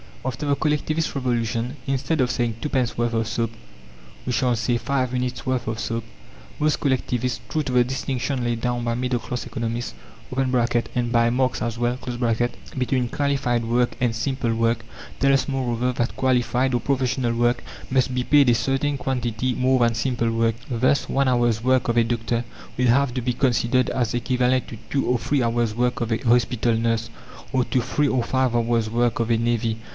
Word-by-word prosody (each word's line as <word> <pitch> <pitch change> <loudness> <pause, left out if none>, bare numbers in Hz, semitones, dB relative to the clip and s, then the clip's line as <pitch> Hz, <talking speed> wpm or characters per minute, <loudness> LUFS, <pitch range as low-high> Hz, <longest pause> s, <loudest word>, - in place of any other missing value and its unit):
After 130 +3 -3
the 140 -1 +2
Collectivist 155 +2 0
Revolution, 120 0 -1
instead 135 +3 0
of 125 - +2
saying 120 -3 -1
"twopence 130 -5 0
worth 120 0 0
of 115 -1 0
soap," 115 -1 -1 0.7
we 125 - -1
shall 125 0 +2
say 120 +1 0
"five 130 +1 -1
minutes' 125 0 -2
worth 130 -3 -1
of 110 0 -2
soap." 115 -1 -2 0.6
Most 150 0 +2
collectivists, 125 -3 0
true 155 - 0
to 135 - -4
the 125 -1 +5
distinction 130 0 -2
laid 120 -1 -1
down 120 0 -1
by 115 0 0
middle 125 0 -1
class 125 +1 -5
economists 115 - -3 0.4
(and 120 -2 0
by 115 -1 +4
Marx 130 +1 0
as 120 -1 -3
well) 120 +1 0 0.8
between 125 -1 0
qualified 140 -5 0
work 120 +1 +1
and 120 -2 +1
simple 125 -1 -1
work, 115 0 0 0.3
tell 135 0 +4
us, 135 - +2
moreover, 125 -2 0
that 120 -1 -1
qualified 125 0 +1
or 120 - 0
professional 130 -2 0
work 120 +1 +1 0.3
must 130 -1 +1
be 125 0 0
paid 140 -1 +5
a 120 - +5
certain 135 +4 0
quantity 125 -2 -1
more 130 +1 +2
than 115 -1 +3
simple 120 -1 0
work. 115 0 +1
Thus 130 +3 +1
one 140 0 +2
hour's 120 -3 +2
work 130 0 +2
of 115 - +1
a 115 - +6
doctor 115 0 -1 0.3
will 125 0 +2
have 130 +1 +3
to 125 - -1
be 125 +1 0
considered 125 0 +2
as 120 -3 0
equivalent 125 +1 +1
to 115 - -8
two 140 - 0
or 125 - +2
three 130 +4 0
hours' 115 -2 0
work 125 +1 0
of 115 0 -1
a 110 - +2
hospital 120 -1 +2
nurse, 115 0 0 0.4
or 130 -2 +2
to 130 - +1
three 145 +4 0
or 130 -3 +1
five 130 -1 +1
hours' 115 -1 +1
work 120 +1 +1
of 115 0 0
a 115 - +4
navvy. 115 -1 0
125 Hz, 190 wpm, -23 LUFS, 115-130 Hz, 0.8 s, a